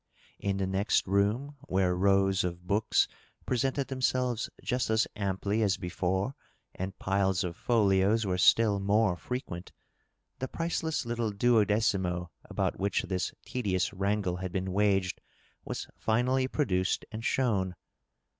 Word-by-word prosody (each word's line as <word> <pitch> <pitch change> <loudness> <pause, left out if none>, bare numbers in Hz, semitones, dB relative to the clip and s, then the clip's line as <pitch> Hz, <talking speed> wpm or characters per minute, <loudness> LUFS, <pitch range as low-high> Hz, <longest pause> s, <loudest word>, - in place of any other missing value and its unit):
In 100 -1 -1
the 95 - 0
next 95 +2 +1
room, 105 +9 0
where 90 -1 +2
rows 95 0 +3
of 90 0 -4
books 105 +4 +2 0.4
presented 135 +2 0
themselves 130 -3 0
just 125 -2 0
as 110 0 +3
amply 100 +1 -1
as 100 -3 +2
before 95 +6 -1 0.4
and 95 +1 -5
piles 95 -1 +1
of 85 -2 -4
folios 105 0 +2
were 90 -1 0
still 105 0 +5
more 100 -1 +2
frequent, 95 -5 -6 0.7
the 130 - -2
priceless 165 -1 -2
little 120 -1 -1
duodecimo 100 -5 +2
about - - -2
which 100 0 0
this 90 -1 -2
tedious 100 -7 -1
wrangle 100 -2 0
had 95 -1 -4
been 95 0 -2
waged 95 -2 +1 0.4
was - - -4 0.2
iSnally 130 +4 +2
produced 95 -11 0
and 110 +1 -6
shown. 100 -9 +1
100 Hz, 130 wpm, -30 LUFS, 95-115 Hz, 0.7 s, still